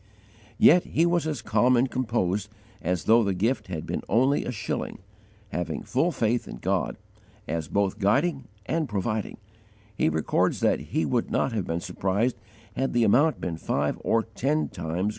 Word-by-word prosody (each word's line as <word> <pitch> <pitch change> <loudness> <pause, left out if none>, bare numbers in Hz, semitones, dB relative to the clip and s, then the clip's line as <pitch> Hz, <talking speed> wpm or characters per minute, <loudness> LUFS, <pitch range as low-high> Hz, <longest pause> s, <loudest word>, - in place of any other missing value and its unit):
Yet 175 +2 +6
he 165 - +2
was 170 -2 +1
as 145 -7 -3
calm 125 +2 +3
and 125 +3 +3
composed 105 -6 -1 0.3
as 90 0 -1
though 115 +1 +5
the 100 -2 0
gift 110 +7 0
had 85 -4 -5
been - - -3
only 130 +7 +3
a - - -2
shilling; 110 -2 -4 0.5
having 90 -3 -3
full - - +1
faith 115 +2 0
in - - -7
God, - - -1 0.5
as 80 -2 -2
both 100 +1 0
guiding 135 - +1 0.2
and 160 +2 -1
providing, 105 +1 -2 0.6
he 80 - +2
records 80 0 +1
that - - +3
he - - -2
would - - 0
not - - +1
have 105 -5 -2
been 85 +1 -2
surprised 100 +9 0 0.4
had 135 +1 -1
the 120 - +3
amount 140 +9 +4
been 85 -3 -3
five 75 -2 -1
or 115 0 +2
ten 135 +8 -1
times 85 -5 -5
greater. 105 - +1
110 Hz, 175 wpm, -26 LUFS, 95-130 Hz, 0.6 s, Yet